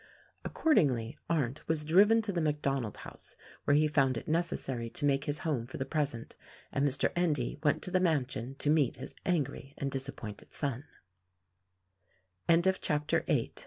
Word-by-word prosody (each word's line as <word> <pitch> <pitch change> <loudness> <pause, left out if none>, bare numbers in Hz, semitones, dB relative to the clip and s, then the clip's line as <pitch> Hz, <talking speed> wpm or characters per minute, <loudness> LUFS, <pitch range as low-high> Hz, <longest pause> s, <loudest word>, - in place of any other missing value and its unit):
Accordingly, 135 - +2
Arndt 145 -5 -1
was 155 -2 +1
driven 205 +8 +5
to 210 - -1
the 175 -3 -1
MacDonald 140 -7 -1
house, - - -9 0.3
where 145 - +4
he 155 +1 +4
found 135 -4 +2
it - - -7
necessary 135 -7 -1
to 145 - -3
make 140 -1 +2
his 145 0 -1
home 130 -7 -1
for 130 - -7
the 130 - -2
present, 140 -7 -2 0.4
and 140 - 0
Mr. 135 0 +2
Endy 150 -7 0
went 150 -3 +1
to 180 - 0
the 185 - +3
mansion 135 -7 0
to 145 +1 +1
meet 150 -6 +3
his - - -8
angry 145 -5 -1
and 140 -1 -2
disappointed 130 -6 -6
so 135 -4 -1
145 Hz, 150 wpm, -31 LUFS, 130-160 Hz, 0.4 s, driven